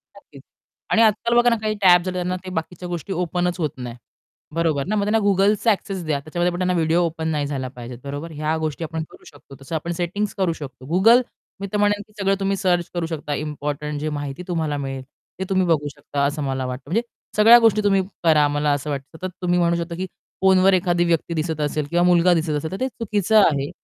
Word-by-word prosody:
नक्कीच -, -, -16 dB, 0.5 s
आणि 225 Hz, -, +4 dB
आजकाल 225 Hz, +2 st, +3 dB
बघा 240 Hz, 0 st, +5 dB
ना, 235 Hz, -, +2 dB
काही 215 Hz, 0 st, 0 dB
टॅबस् 180 Hz, -1 st, +6 dB
आलेत 185 Hz, -, -2 dB
त्यांना 180 Hz, 0 st, -1 dB
ते -, -, -5 dB
बाकीच्या 175 Hz, +2 st, -4 dB
गोष्टी 175 Hz, +2 st, -4 dB
ओपनच 180 Hz, 0 st, -1 dB
होत 155 Hz, -3 st, 0 dB
नाही. 120 Hz, -2 st, -6 dB, 0.6 s
बरोबर 155 Hz, -5 st, +1 dB
ना 215 Hz, -, 0 dB
मग 205 Hz, -, +1 dB
त्यांना 210 Hz, +2 st, +2 dB
Googleचा 205 Hz, +3 st, +3 dB
एक्सेस 195 Hz, -2 st, -3 dB
द्या 150 Hz, -2 st, 0 dB
त्याच्यामध्ये 175 Hz, +4 st, -1 dB
पण 175 Hz, -, -4 dB
त्यांना 185 Hz, 0 st, +1 dB
व्हिडिओ 165 Hz, 0 st, +2 dB
ओपन 160 Hz, -1 st, -3 dB
नाही 150 Hz, -3 st, -1 dB
झाला 135 Hz, -3 st, -3 dB
पाहिजे, 125 Hz, -1 st, -9 dB
बरोबर. 145 Hz, +4 st, -6 dB
ह्या 155 Hz, +1 st, -1 dB
गोष्टी 160 Hz, 0 st, -3 dB
आपण 160 Hz, 0 st, -3 dB
करू -, -, -17 dB
शकतो, 140 Hz, -1 st, -15 dB
तसं 135 Hz, +4 st, -5 dB
आपण 165 Hz, +2 st, -3 dB
सेटिंग्स 195 Hz, +4 st, -2 dB
करू 185 Hz, -4 st, +1 dB
शकतो. 130 Hz, -3 st, -9 dB
Google 225 Hz, +7 st, +6 dB, 0.4 s
मी 200 Hz, -, -4 dB
तर -, -, +2 dB
म्हणेल 205 Hz, 0 st, +2 dB
की 215 Hz, -, -25 dB
सगळं 195 Hz, 0 st, +2 dB
तुम्ही 195 Hz, 0 st, 0 dB
सर्च 175 Hz, -3 st, +1 dB
करू 175 Hz, -2 st, -1 dB
शकता 150 Hz, -3 st, -4 dB
इम्पोर्टंट 150 Hz, 0 st, -4 dB
जे 155 Hz, -, -1 dB
माहिती 145 Hz, +4 st, -6 dB
तुम्हाला 160 Hz, -4 st, -1 dB
मिळेल, 135 Hz, -2 st, -4 dB, 0.4 s
ते -, -, -1 dB
तुम्ही 190 Hz, -1 st, +2 dB
बघू 155 Hz, -3 st, +1 dB
शकता 145 Hz, -1 st, -3 dB
असं 145 Hz, +1 st, -2 dB
मला 135 Hz, -1 st, -2 dB
वाटतं. 125 Hz, +1 st, -5 dB
म्हणजे 225 Hz, +6 st, +2 dB, 0.4 s
सगळ्या 225 Hz, +3 st, +8 dB
गोष्टी 225 Hz, -2 st, +4 dB
तुम्ही 195 Hz, -1 st, +3 dB, 0.2 s
करा 155 Hz, -3 st, +5 dB
मला 145 Hz, 0 st, 0 dB
असं 145 Hz, +1 st, -3 dB
वाटतं, 140 Hz, +2 st, -5 dB
सतत 185 Hz, +2 st, -5 dB
तुम्ही 180 Hz, 0 st, +1 dB
म्हणू 170 Hz, 0 st, +2 dB
शकता, 170 Hz, 0 st, -4 dB
की 185 Hz, +2 st, -3 dB, 0.4 s
फोनवर 190 Hz, 0 st, +5 dB
एखादी 175 Hz, -1 st, +2 dB
व्यक्ती 170 Hz, 0 st, 0 dB
दिसत 160 Hz, -1 st, -2 dB
असेल 150 Hz, 0 st, -1 dB
किंवा 175 Hz, +2 st, +2 dB
मुलगा 180 Hz, 0 st, +5 dB
दिसत 165 Hz, -1 st, 0 dB
असेल, 155 Hz, +2 st, -4 dB
तर 190 Hz, -, -5 dB
ते 260 Hz, -, 0 dB
चुकीचं 220 Hz, -4 st, 0 dB
आहे 140 Hz, -4 st, +1 dB
170 Hz, 225 wpm, -22 LUFS, 150-190 Hz, 0.6 s, सगळ्या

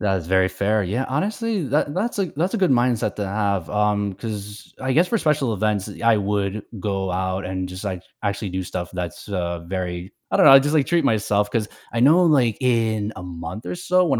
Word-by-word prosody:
That 100 Hz, -3 st, +1 dB
is 85 Hz, -2 st, -8 dB
very 95 Hz, 0 st, +4 dB
fair, 100 Hz, +2 st, 0 dB
yeah, 115 Hz, +9 st, -1 dB
honestly, 205 Hz, -, -1 dB
that 145 Hz, +2 st, +1 dB
that's 205 Hz, +5 st, -1 dB
a 195 Hz, -, +1 dB
that's 180 Hz, +6 st, 0 dB
a -, -, +2 dB
good 185 Hz, -6 st, +2 dB
mindset 120 Hz, -4 st, +1 dB
to 105 Hz, -, -2 dB
have, 100 Hz, -3 st, -1 dB
um, 105 Hz, -1 st, +1 dB
'cause, 105 Hz, 0 st, -7 dB
I 130 Hz, 0 st, -1 dB
guess, 170 Hz, +6 st, +3 dB
for 230 Hz, -, +1 dB
special 150 Hz, -, +1 dB
events, 105 Hz, -2 st, -1 dB
I 115 Hz, -1 st, +5 dB
would 100 Hz, 0 st, -1 dB, 0.2 s
go 95 Hz, -1 st, -2 dB
out 95 Hz, +1 st, -2 dB
and 95 Hz, 0 st, -3 dB
just, 90 Hz, 0 st, -8 dB
like, 95 Hz, -3 st, -4 dB, 0.2 s
actually 100 Hz, 0 st, -2 dB
do 95 Hz, +1 st, -2 dB
stuff 90 Hz, 0 st, -5 dB
that's 90 Hz, 0 st, -6 dB
uh, 85 Hz, -3 st, -2 dB
very 90 Hz, 0 st, -4 dB, 0.2 s
I -, -, +2 dB
don't -, -, +5 dB
know, -, -, +10 dB
I 135 Hz, -, +11 dB
just, 145 Hz, +3 st, 0 dB
like, 145 Hz, -3 st, +4 dB
treat 170 Hz, -3 st, +2 dB
myself, 105 Hz, -3 st, +1 dB
'cause 110 Hz, -1 st, -1 dB, 0.2 s
I 115 Hz, -, -1 dB
know, 155 Hz, +8 st, +6 dB
like, 130 Hz, -9 st, +3 dB
in 110 Hz, -4 st, +1 dB
a 90 Hz, -, -7 dB
month 90 Hz, +5 st, -7 dB
or -, -, -3 dB
so, 180 Hz, +1 st, +2 dB
1 140 Hz, -8 st, +1 dB
105 Hz, 225 wpm, -22 LUFS, 95-135 Hz, 0.2 s, I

